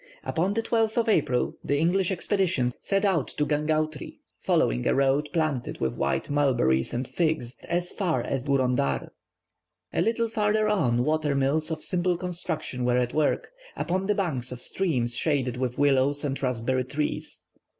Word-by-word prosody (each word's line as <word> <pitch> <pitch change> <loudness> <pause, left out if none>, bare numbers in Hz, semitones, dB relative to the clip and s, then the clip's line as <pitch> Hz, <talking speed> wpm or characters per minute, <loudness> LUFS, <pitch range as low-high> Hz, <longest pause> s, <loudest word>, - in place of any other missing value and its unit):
Upon 185 +5 0
the 225 - 0
12th 225 -1 +1
of 235 0 +2
April 135 - +1
the 145 - 0
English 175 +4 +2
expedition 180 -8 +1
set 195 +1 +1
out 180 -8 0
for 150 - +2
Gangautri, 155 0 -1 0.2
following - - +1
a - - +3
road 140 +2 +2
planted 155 -7 -1
with 65 -2 0
white - - -1
mulberries 125 - +2
and 125 +1 -2
figs, 155 -7 -1
as 175 +1 0
far 180 -6 -1
as 135 -2 -2
Gourondar. 125 - +1 0.8
A - - +1
little 230 +1 +1
farther 215 -1 +1
on 125 - +2
water 155 -2 +1
mills 140 +4 +2
of 160 -1 -3
simple 180 -1 0
construction 170 -7 -3
were 125 0 +2
at 125 -1 0
work, 155 -1 +1 0.3
upon 185 +2 -1
the 210 - +2
banks 140 - -1
of 125 - -6
streams 125 -7 -1
shaded 130 -3 0
with 125 -1 -2
willows 145 0 +3
and 135 -1 -2
raspberry 130 0 0
trees. 145 +4 -3
150 Hz, 160 wpm, -26 LUFS, 130-180 Hz, 0.8 s, a